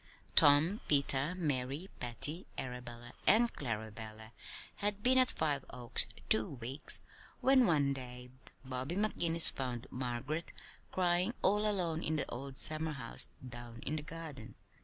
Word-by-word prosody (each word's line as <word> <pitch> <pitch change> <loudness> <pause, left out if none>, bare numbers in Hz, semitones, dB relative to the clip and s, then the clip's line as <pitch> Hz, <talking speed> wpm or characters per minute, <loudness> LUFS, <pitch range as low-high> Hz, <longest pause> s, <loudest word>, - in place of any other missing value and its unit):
Tom, 150 +8 +6
Peter, 140 +2 +3
Mary, 145 -1 -2
Patty, 135 +8 -2
Arabella, 120 -1 -7
and 235 +2 +4
Clarabella 110 -2 -6 0.5
had 205 0 -2
been 260 +1 +5
at 255 0 +4
Five 145 -4 -1
Oaks 120 -1 0 0.2
two 110 +5 +3
weeks 130 +3 0 0.4
when 260 -2 +5
one 145 -4 +2
day 125 -1 -8 0.3
Bobby 130 +5 -3
McGinnis 170 -5 +4
found 125 -2 -5
Margaret 130 +6 -4 0.4
crying 180 +4 +1
all 210 +2 +3
alone 170 -5 -1
in 160 - -1
the 150 - -1
old 135 +2 -7
summerhouse 155 -6 +3 0.2
down 120 -1 -9
in 150 - -2
the 155 - -3
garden. 150 -6 -9
140 Hz, 130 wpm, -34 LUFS, 125-170 Hz, 0.5 s, Tom